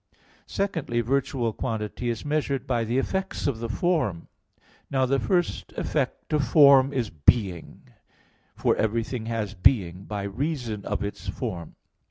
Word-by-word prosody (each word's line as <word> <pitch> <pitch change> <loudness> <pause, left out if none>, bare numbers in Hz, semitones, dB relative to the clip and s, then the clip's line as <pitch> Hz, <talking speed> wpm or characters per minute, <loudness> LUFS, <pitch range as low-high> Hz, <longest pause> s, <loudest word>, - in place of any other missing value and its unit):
Secondly, 165 -12 -1
virtual 125 -1 0
quantity 115 0 -3
is 115 +2 -3
measured 145 -3 -1
by 115 - 0
the 115 +3 -1
effects 190 +8 -2
of 135 -6 0
the 115 0 -4
form. 125 - 0 0.6
Now 130 -1 +2
the 135 +1 +1
first 175 +1 -1
effect - - -2
of 150 -2 +3
form 140 -3 +7
is 125 -6 -2
being, 85 +3 +1 0.7
for - - +2
everything 115 +1 -1
has 110 -3 -2
being 95 -3 +2
by 105 -1 -4
reason 115 -1 -3
of - - -2
its 100 - -6
form. 85 -3 -5
120 Hz, 140 wpm, -26 LUFS, 105-140 Hz, 0.7 s, form